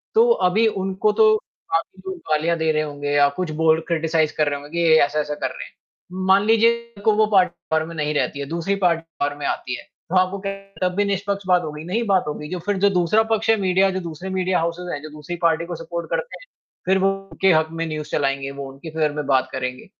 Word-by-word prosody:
तो 465 +2 +6 0.2
अभी 220 +4 +3
उनको 195 +1 0
तो 215 0 +6 0.4
काफ़ी 170 +3 -2
लोग 190 -1 -4
गालियाँ 165 +2 +2
दे 160 0 +1
रहे 155 0 +1
होंगे 145 -1 -4
या 145 0 +5
कुछ 180 -4 -2
बोल 160 0 +4
क्रिटीसाइज़ 160 -2 +1
कर 150 -1 +2
रहे 145 0 -3
होंगे, 145 +1 -12
कि 170 0 0
ये 160 - +7
ऐसा-ऐसा 150 0 -1
कर - - -2
रहे - - -8
हैं। - - -21 0.5
मान 195 +1 +5
लीजिए 235 +1 +2
उनको 210 +1 +2
वो 215 0 +4
पार्टी 180 -3 +4 0.2
पावर 160 0 +2
में 165 0 -9
नहीं 150 -1 -1
रहती 145 -1 -1
है, 140 - -3
दूसरी 170 +4 -1
पार्टी 170 -1 +3 0.2
पॉवर 145 0 0
में 140 - -4
आती 125 -1 -2
है, - - -11 0.3
तो 185 - -2
आपको 185 +2 +2
क्या, 195 -1 -4
तब 180 - -4
भी 205 0 +2
निष्पक्ष 200 0 -2
बात 180 -1 +4
हो 155 - -4
गई, 150 +1 -8
नहीं 220 +7 -1
बात 190 -2 +3
हो 150 - -1
गई, 150 0 -8
जो 180 - -4
फिर 205 -1 0
जो 200 +1 +4
दूसरा 185 +4 +3
पक्ष 225 +1 +1
है 225 - +6
मीडिया 190 +1 +3
जो 190 - -2
दूसरे 170 +2 -7
मीडिया 185 -1 0
हाउसेज़ 170 +2 -3
हैं, 145 - -4
जो 155 - -7
दूसरी 150 +3 -7
पार्टी 165 0 +2
को 175 0 -5
सपोर्ट 170 +1 -6
करते - - -3
हैं, - - -14 0.4
फिर 190 +1 +3
वो 195 +1 +3 0.2
उनके 190 -1 +3
हक 160 0 +3
में 165 0 -3
न्यूज़ 155 -1 -5
चलाएँगे, 135 -1 -1
वो 140 -1 -7
उनकी 140 +4 -10
फ़ेवर 155 -2 0
में 150 -1 -3
बात 135 -2 +2
करेंगे। 125 -1 -4
170 Hz, 250 wpm, -22 LUFS, 150-195 Hz, 0.5 s, ये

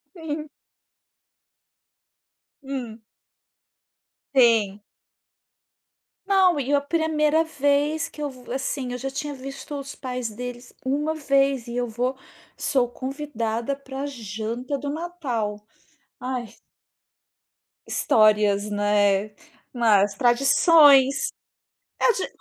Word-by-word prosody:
Sim. 310 -2 -5 2.1
Hum. 245 -5 -6 1.3
Sim. 220 -5 +4 1.5
Não, 375 -5 +4
e 275 +1 -1
a 285 - +4
1ª 315 0 +1
vez 295 +1 +1
que 300 - -10
eu 295 - -1 0.2
assim, 265 -1 -3
eu 250 - -3
já 270 +2 -4
tinha 290 +2 -4
visto 275 +2 -8
os 275 0 -8
pais 250 -3 -4
deles 245 +2 -8
1 295 +4 0
vez 275 -4 +1
e 235 - -6
eu 245 0 0
vou 250 +4 -2 0.4
sou 255 -3 +1
convidada 255 -3 -3
pra 275 0 -6
janta 235 +1 -4
do 285 +1 -5
Natal, 285 -10 -3 0.6
ai 250 -1 -3 1.4
Histórias, 210 -1 +3
né. 205 0 +2 0.4
Nas 210 -5 +3
tradições. 275 - +5 0.7
A 485 - +4
ge 380 - -3
265 Hz, 95 wpm, -24 LUFS, 230-290 Hz, 2.1 s, tradições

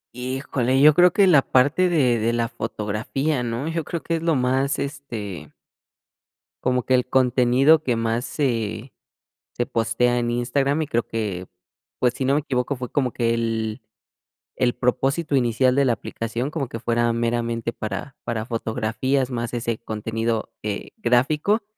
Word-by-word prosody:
Híjole, 130 0 -1
yo 150 +2 +8
creo 180 +3 +6
que 200 +3 +4
la 165 -7 +6
parte 140 +9 +3
de 130 -9 +2
de 115 +2 +1
la 115 -1 0
fotografía, 115 +7 -2
¿no?, 120 +4 -3
yo 165 0 -2
creo 170 +2 -5
que 165 - -1
es - - -6
lo 165 -1 +2
más, 130 +2 +1
este 110 - -6 1.1
como 125 -1 +1
que 130 - 0
el 125 -1 +3
contenido 130 +4 +4
que 125 -6 0
más 115 +1 0
se 115 -4 -2 0.6
se 120 - -1
postea 115 +2 +1
en 120 0 -1
Instagram, 135 +5 0
y 155 - -2
creo 120 -5 0
que, 105 -5 -3 0.5
pues, 125 0 +2
si 135 - -2
no 135 - +3
me 145 - +3
equivoco, 130 -1 -1
fue 125 -1 -6
como 130 -4 0
que 115 -1 +1
el 115 0 -2 0.8
el 120 -1 +1
propósito 135 +5 0
inicial 125 0 +2
de 140 0 +3
la 125 - +3
aplicación, 115 +4 -4
como 155 -4 -2
que 115 - -6
fuera 120 0 +1
meramente 115 0 -1
para 110 +5 -5
para 110 -2 -3
fotografías, 120 +3 -1
más 120 -1 -3
ese 115 -1 -2
contenido, 115 0 -3
eh, 105 -1 -4
gráfico, 150 - +2
125 Hz, 165 wpm, -23 LUFS, 115-140 Hz, 1.1 s, yo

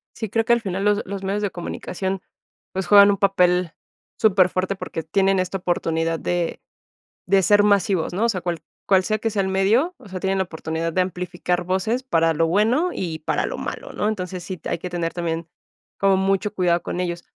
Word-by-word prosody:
Sí, 220 - -4
creo 225 +2 0
que 235 - +4
al 235 - +2
final 195 -1 -3
los 210 0 +3
los 195 0 -6
medios 200 +2 -1
de 205 - 0
comunicación, 185 +2 -4 0.5
pues, 190 0 -3
juegan 200 -1 +8
un 200 - 0
papel 180 -3 +2 0.5
superfuerte 190 -2 +3
porque 165 -3 -5
tienen 195 +3 +2
esta 185 +1 -1
oportunidad 165 -3 -1
de 175 -1 -2 0.7
de 195 +1 +4
ser 205 +3 +5
masivos, 200 -4 +2
¿no? 205 +6 +1
O - - +2
sea, 185 -5 -1
cual 170 -2 -3 0.2
cual 190 -2 +4
sea 215 +2 0
que 225 - -1
sea 200 - 0
el 190 - -1
medio, 220 - +2
o 255 -5 -15
sea, 185 -1 -6
tienen 195 0 0
la 190 - +1
oportunidad 160 0 -4
de 185 - +2
amplificar 180 -1 -2
voces 190 +8 -1
para 165 -10 +2
lo 165 +1 +1
bueno 225 - +2
y 165 -4 -4
para 155 - -1
lo - - -4
malo, - - -6
¿no? 210 - -1
Entonces 185 -4 -3
sí 185 0 -6
t - - -7
hay - - -1
que 180 +2 -6
tener 170 -1 -2
también 165 -1 -3 0.5
como 195 -1 +3
mucho 195 +2 0
cuidado 175 -3 +1
con - - -4
ellos. 175 -1 -3
190 Hz, 210 wpm, -22 LUFS, 175-200 Hz, 0.7 s, juegan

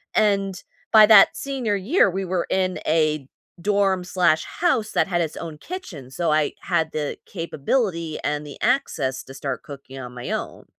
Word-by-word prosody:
and, 195 -3 +1 0.3
by 215 -1 +9
that 215 -3 +7
senior 260 -7 -2
year 200 - +3
we 190 +1 -3
were 180 -1 -1
in 185 -1 0
a 155 -3 +1 0.3
dorm 195 -2 +1
slash 170 -3 +2
house 245 -11 0
that - - +2
had 175 -2 0
its 160 - -3
own 160 -3 -7
kitchen, 170 - -8
so 165 +1 -1
I 155 -1 +2
had 160 0 0
the 150 -2 -3
capability 170 - -2
and 150 0 -2
the 145 - -9
access 160 - 0
to 135 - -12
start 135 -2 -4
cooking 140 -2 -10
on 125 -1 -8
my 120 - -7
own. - - -4
175 Hz, 175 wpm, -23 LUFS, 150-205 Hz, 0.3 s, by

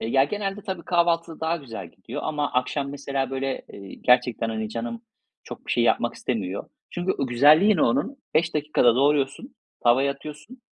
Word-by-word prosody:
Ya, 135 +4 +3
genelde 200 +4 -3
tabii 185 -4 -4
kahvaltıda 170 -2 +1
daha 160 +1 0
güzel 130 -8 -8
gidiyor - - -8
ama 150 -2 -1
akşam 140 +2 -1
mesela 140 -2 -3
böyle, 135 0 -3
eee, 100 -1 -10
gerçekten, 125 -2 +2
hani, 110 -1 -3
canım 120 - -5 0.4
çok - - -10
bir - - -1
şey - - +2
yapmak - - +2
istemiyor. - - -3 0.2
Çünkü 175 +1 -1
o 135 - 0
güzelliği 155 - +5
ne - - +2
onun? 140 - +1 0.2
5 165 0 +2
dakikada 150 -5 +3
doğruyorsun, 145 - +1 0.3
tavaya 135 +4 +4
atıyorsun. 155 - -11
145 Hz, 165 wpm, -24 LUFS, 125-170 Hz, 0.4 s, güzelliği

